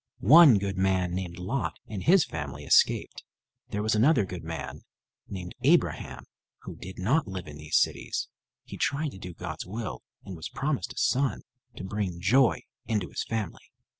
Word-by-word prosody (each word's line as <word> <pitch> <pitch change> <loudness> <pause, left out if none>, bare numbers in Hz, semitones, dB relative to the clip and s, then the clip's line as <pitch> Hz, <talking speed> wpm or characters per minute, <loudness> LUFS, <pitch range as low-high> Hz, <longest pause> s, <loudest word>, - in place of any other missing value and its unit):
One 145 - +8
good 100 -1 -3
man 95 -2 +1
named 90 -2 -4
Lot 100 +9 -3
and 105 -3 -6
his 175 - +5
family - - -6
escaped. - - +3 0.5
There 105 0 -2
was 110 - +1
another 115 0 +4
good 90 -2 -7
man 80 0 -6 0.5
named 90 -2 -7
Abraham - - +1 0.4
who - - -8
did 95 +1 -10
not 125 - +1
live 95 -3 -6
in 75 -1 -9
these 75 +1 0
cities. - - 0 0.4
He - - -9
tried 150 +2 0
to 95 - -11
do 90 -3 -8
God's 80 -2 -6
will 110 +4 -5 0.2
and 95 - -7
was 80 - -7
promised 140 0 -2
a - - -24
son 135 +1 +1 0.3
to - - -7
bring 95 -3 -3
joy 120 +6 +3 0.2
into 105 -5 -1
his - - -3
family. 110 -6 -5
95 Hz, 170 wpm, -28 LUFS, 90-120 Hz, 0.5 s, One